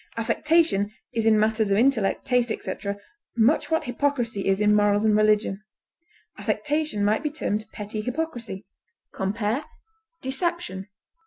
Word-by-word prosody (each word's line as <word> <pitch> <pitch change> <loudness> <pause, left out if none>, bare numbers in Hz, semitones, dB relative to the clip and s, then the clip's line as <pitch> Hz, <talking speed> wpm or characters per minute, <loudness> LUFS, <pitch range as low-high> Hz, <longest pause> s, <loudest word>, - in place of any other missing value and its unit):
Affectation 300 -3 +2 0.2
is 225 -1 0
in 220 -1 +5
matters 220 0 +2
of 195 - +3
intellect, 230 -4 +2
taste, 245 -2 +2
etc., 200 -2 -4 0.4
much 235 +7 +3
what 320 0 +1
hypocrisy 245 -5 -1
is 195 0 +2
in 210 0 +4
morals 205 0 +3
and 215 -1 +4
religion; 210 -2 +2 0.8
affectation 300 -8 0
might 215 +4 +2
be 300 - -1
termed 215 -8 -2
petty 210 +1 -5
hypocrisy. 240 -6 -4 0.5
Compare 210 +7 -1 0.6
DECEPTION. 265 - -2
220 Hz, 130 wpm, -25 LUFS, 205-275 Hz, 0.8 s, in